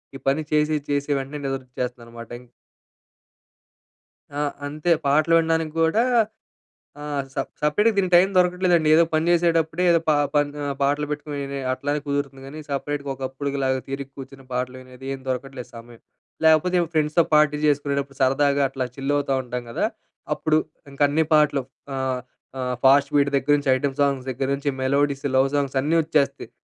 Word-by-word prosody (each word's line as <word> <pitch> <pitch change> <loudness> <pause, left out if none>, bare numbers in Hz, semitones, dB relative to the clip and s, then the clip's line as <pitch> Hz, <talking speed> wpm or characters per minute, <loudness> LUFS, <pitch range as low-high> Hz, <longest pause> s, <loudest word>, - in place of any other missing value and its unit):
ఈ - - -7
పని 140 +3 +1
చేసి, 150 0 +2
చేసి 145 0 -1
వెంటనే 140 +2 -6
నిదరొచ్చేస్తదనమాట. 125 -3 -6
ఇం 125 - -17 1.9
ఆ! - - -1 0.3
అంతే. 150 +4 -2
పాటలు 155 +4 +3
వినడానికి 160 -1 0
గూడా 185 +9 +3 1.0
ఆహ్, 145 -2 -3
స - - -24 0.3
సపరేట్‌గా 210 +10 +3
దీనికి 185 -2 +1
టైం 180 +2 +6
దొరకట్లేదండి. 180 -3 +3
ఏదో 165 - +6
పని 155 +1 +1
జేసేటప్పుడే 165 -1 +2
ఏదో 170 - +5
పా 155 - +5 0.2
పన్ 145 0 +3
ఆహ్, 140 -1 -2
పాటలు 145 +2 +1
పెట్టుకొని 150 0 -4
వినే 140 0 -5
అట్లానే 145 +3 -2
కుదురుతుంది 140 -1 -3
గానీ, 150 +3 -8
సపరేట్‌గా 140 0 -3
ఒకప్పుడుకి 135 +1 -4
లాగా 130 0 +1
తీరిక 135 0 -5
కూర్చుని 135 0 -11
పాటలు 125 +1 -2
వినేది 130 +1 -13
ఏం 135 - -9
దొరకట్లేదు 130 0 -4
సమయం. 115 0 -13 0.4
లాకపోతే, 160 +3 +4
ఎవో 170 - -1
ఫ్రెండ్స్‌తో 155 +2 +3
పార్టీ 150 -1 +4
చేసుకునేటప్పుడు, 140 -2 -1
సరదాగా 140 +2 +3
అట్లా 130 -1 -3
చిల్ 135 +1 -1
అవుతా 140 -1 0
ఉంటాం 125 0 -5
గదా. - - 0 0.5
అప్పుడు 155 0 +2 0.3
ఇంకా 140 +1 +1
అన్ని 155 +3 +2
పాటలు. 150 -2 +3 0.3
ఆహ్, 130 -1 -1 0.4
ఆహ్, 125 0 -1
ఫాస్ట్ 140 +2 +5
బీట్ 140 0 +3
దగ్గర 145 +2 +2
నుంచి, 140 -2 0
ఐటెమ్ 135 0 -2
సాంగ్స్ 135 -2 0
దగ్గర 130 +2 -3
నుంచి, 140 0 -2
మెలోడీస్, 140 +1 +1
లవ్ 135 +1 +4
సాంగ్స్ 140 -1 0
అన్నీ 155 +4 +1
వచ్చేస్తాయి. 140 -6 0
140 Hz, 160 wpm, -23 LUFS, 135-150 Hz, 1.9 s, టైం